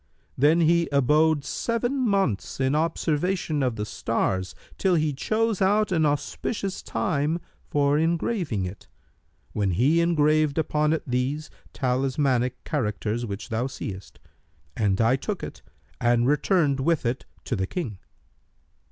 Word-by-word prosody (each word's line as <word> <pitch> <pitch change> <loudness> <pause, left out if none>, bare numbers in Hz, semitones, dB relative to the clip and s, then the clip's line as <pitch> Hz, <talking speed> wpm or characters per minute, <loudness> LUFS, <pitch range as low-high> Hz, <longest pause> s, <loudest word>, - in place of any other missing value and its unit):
Then 150 +6 +4
he 170 +1 +3
abode 150 +2 +3
seven 240 +3 -1
months 195 - 0
in 130 +1 +2
observation 160 0 0
of 125 -3 0
the 105 -1 -3
stars, 95 -2 -1 0.2
till 190 -2 +3
he 155 -2 +1
chose 215 +8 0
out 205 +1 +3
an 160 -4 +3
auspicious 185 +7 -2
time 155 +1 -1 0.3
for 145 0 +2
engraving 165 - 0
it, 90 +3 -8 0.7
when 100 -2 0
he 140 - +3
graved 155 0 +3
upon 150 -1 +1
it 160 - 0
these 130 +4 -2 0.2
talismanic 130 -1 0
characters 115 -3 -2
which 100 +4 -6
thou 115 +3 -1
seest, 100 -7 -7 0.6
and 100 -3 +1
I 115 +3 +4
took - - -4
it - - -7 0.4
and 120 0 +3
returned 145 0 +2
with 155 +1 +1
it 120 +2 -1 0.2
to 125 - -2
the 95 -2 -1
King.'" 115 - -4
145 Hz, 135 wpm, -25 LUFS, 120-165 Hz, 0.7 s, Then